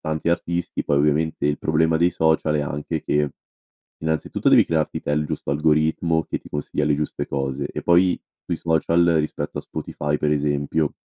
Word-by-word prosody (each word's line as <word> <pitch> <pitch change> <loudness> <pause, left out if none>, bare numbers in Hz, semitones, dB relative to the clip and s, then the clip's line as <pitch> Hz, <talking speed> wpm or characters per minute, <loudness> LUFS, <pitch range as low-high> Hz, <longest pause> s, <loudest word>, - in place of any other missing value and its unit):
tanti 80 0 -2
artisti, 85 0 -1
poi 70 -1 +2
ovviamente 75 +1 +1
il 75 0 0
problema 80 +1 +2
dei 85 +2 +3
social 80 -2 +1
è - - +1
anche 75 +2 -3
che, 75 -1 +1 0.7
innanzitutto, 80 0 0
devi - - +6
crearti 80 -2 -1
te 75 - -2
il 75 0 +1
giusto 70 - -4
algoritmo, 80 +2 +2
che - - -3
ti - - -15
consiglia 75 0 -2
le 75 0 +2
giuste 75 0 -3
cose. 70 +1 -2
E - - -5
poi, 90 +1 +3 0.2
sui - - -2
social, 85 +1 +2
rispetto 75 - -3
a - - -3
Spotify, 75 0 -3
per 75 0 +1
esempio, 75 +1 0
75 Hz, 180 wpm, -22 LUFS, 75-80 Hz, 0.7 s, devi